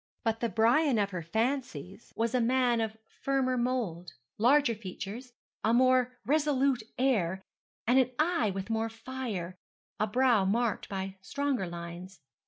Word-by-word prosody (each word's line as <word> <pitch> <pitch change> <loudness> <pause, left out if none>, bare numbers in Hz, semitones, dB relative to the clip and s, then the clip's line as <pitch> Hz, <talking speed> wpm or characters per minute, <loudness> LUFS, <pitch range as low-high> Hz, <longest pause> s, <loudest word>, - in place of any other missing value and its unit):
But 225 -1 0
the 235 - 0
Brian 235 - +3
of 200 -1 +1
her 180 -2 -3
fancies 220 - -3
was 230 +1 0
a 250 - +3
man 245 -1 +2
of 220 0 -3
firmer 265 0 -1
mould, 225 - -2 0.3
larger 265 +2 +4
features, 215 +4 -7 0.3
a 225 +2 +3
more 255 0 +3
resolute 280 -2 +2 0.2
air, 190 -8 +1 0.4
an 255 +1 +4
eye 310 -8 +2
with 195 +3 -4
more 225 0 0
fire, 225 -7 -5 0.4
a 215 - +2
brow 240 -2 +3
marked 220 +2 0
by 195 0 -4
stronger 275 -3 -1
lines. 170 +1 -8
230 Hz, 140 wpm, -30 LUFS, 195-255 Hz, 0.4 s, larger